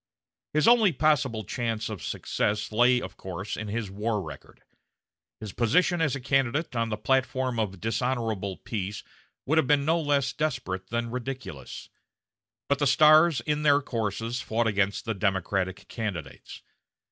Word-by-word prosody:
His 155 Hz, -, +3 dB
only 230 Hz, -5 st, +6 dB
possible 135 Hz, -7 st, +1 dB
chance 115 Hz, +1 st, -2 dB
of 105 Hz, -5 st, -6 dB
success 105 Hz, +1 st, -2 dB
lay, 120 Hz, +3 st, +4 dB
of -, -, -8 dB
course, 95 Hz, +2 st, -5 dB
in 110 Hz, -, -5 dB
his 105 Hz, -1 st, -3 dB
war 105 Hz, +2 st, -1 dB
record. 80 Hz, -7 st, -10 dB, 0.8 s
His 105 Hz, -4 st, -7 dB
position 175 Hz, -, +2 dB
as 155 Hz, -4 st, +1 dB
a -, -, -4 dB
candidate 135 Hz, +2 st, 0 dB
on 115 Hz, -1 st, 0 dB
a 105 Hz, -, -1 dB
platform 130 Hz, +1 st, 0 dB
of 95 Hz, -4 st, -2 dB
dishonorable 115 Hz, -3 st, -2 dB
peace 105 Hz, -2 st, -5 dB, 0.4 s
would 160 Hz, +3 st, +3 dB
have 155 Hz, -, +1 dB
been 145 Hz, 0 st, +3 dB
no 165 Hz, +2 st, +2 dB
less 140 Hz, -3 st, +1 dB
desperate 125 Hz, -11 st, -3 dB
than 115 Hz, 0 st, -2 dB
ridiculous. 125 Hz, -, -6 dB, 0.8 s
But 140 Hz, 0 st, +1 dB
the 145 Hz, -, +2 dB
stars 155 Hz, 0 st, +6 dB
in 150 Hz, +4 st, -1 dB
their 145 Hz, -1 st, +5 dB
courses 115 Hz, -1 st, -3 dB
fought 115 Hz, +1 st, 0 dB
against 100 Hz, +1 st, 0 dB
the 115 Hz, -, -1 dB
Democratic 95 Hz, -1 st, -1 dB
candidates. 90 Hz, -, -6 dB
115 Hz, 150 wpm, -27 LUFS, 105-140 Hz, 0.8 s, only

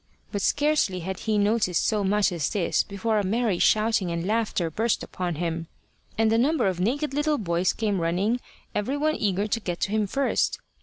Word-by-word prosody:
But 205 Hz, -, -2 dB
scarcely 290 Hz, -10 st, +1 dB
had 190 Hz, +2 st, -4 dB
he 215 Hz, -1 st, 0 dB
noticed 205 Hz, -4 st, +2 dB
so 210 Hz, -2 st, +1 dB
much 200 Hz, +1 st, +2 dB
as 165 Hz, -5 st, -1 dB
this 200 Hz, -5 st, +1 dB
before 215 Hz, +2 st, -1 dB
a -, -, 0 dB
merry 210 Hz, -1 st, 0 dB
shouting 215 Hz, -4 st, +3 dB
and 170 Hz, 0 st, -2 dB
laughter 210 Hz, -5 st, 0 dB
burst 225 Hz, +7 st, 0 dB
upon 180 Hz, -2 st, -4 dB
him, 165 Hz, 0 st, -3 dB, 0.5 s
and 220 Hz, 0 st, +3 dB
a 225 Hz, -, +3 dB
number 300 Hz, +3 st, +2 dB
of 185 Hz, -2 st, 0 dB
naked 270 Hz, +9 st, 0 dB
little 295 Hz, +1 st, +1 dB
boys 175 Hz, -4 st, +1 dB
came 205 Hz, -5 st, -1 dB
running, 190 Hz, +8 st, +1 dB, 0.3 s
every 255 Hz, +8 st, -1 dB
one 310 Hz, +1 st, +1 dB
eager 200 Hz, -1 st, 0 dB
to 215 Hz, +2 st, -1 dB
get 175 Hz, -5 st, -4 dB
to 200 Hz, -, 0 dB
him 215 Hz, -1 st, +1 dB
first. 275 Hz, +7 st, 0 dB
205 Hz, 195 wpm, -25 LUFS, 180-230 Hz, 0.5 s, shouting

